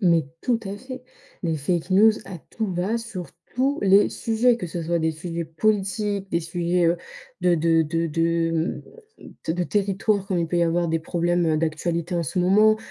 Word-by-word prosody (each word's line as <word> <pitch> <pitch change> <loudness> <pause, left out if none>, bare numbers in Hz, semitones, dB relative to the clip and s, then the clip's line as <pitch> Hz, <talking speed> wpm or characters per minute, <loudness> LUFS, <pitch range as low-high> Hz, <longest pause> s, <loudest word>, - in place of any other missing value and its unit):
Mais 170 -6 +3 0.2
tout 240 -2 +1
à 195 +1 -5
fait. 255 +3 -9 0.4
Les 165 -2 0
fake 170 +5 -2
news, 215 +4 +6
à 190 -3 -8
tout 215 -4 -3
va, 190 +7 -1
sur 210 -6 -7 0.3
tous 275 +3 +1
les 195 +1 +5
sujets, 230 +2 +2
que 180 - -5
ce 170 +1 -4
soit 170 +1 0
des 160 0 +1
sujets 170 +1 -5
politiques, 200 +3 -1
des 170 - +2
sujets, 170 +1 0
heu, 170 +1 +3 0.4
de 175 -1 +3
de 165 0 +3
de 165 +2 -1
de 165 +1 +1
mmh, 165 +1 -1 0.7
de - - +3
de 180 +1 -1
territoire, 200 0 0
comme 185 - 0
il 170 - 0
peut 175 - -2
y - - +3
avoir 170 +1 +1
des 165 0 0
problèmes, 175 +1 0
heu, 155 -1 +2
d'actualité 165 +2 -1
en 170 - +1
ce 160 - -3
moment, 210 +4 +5
175 Hz, 200 wpm, -24 LUFS, 165-200 Hz, 0.7 s, news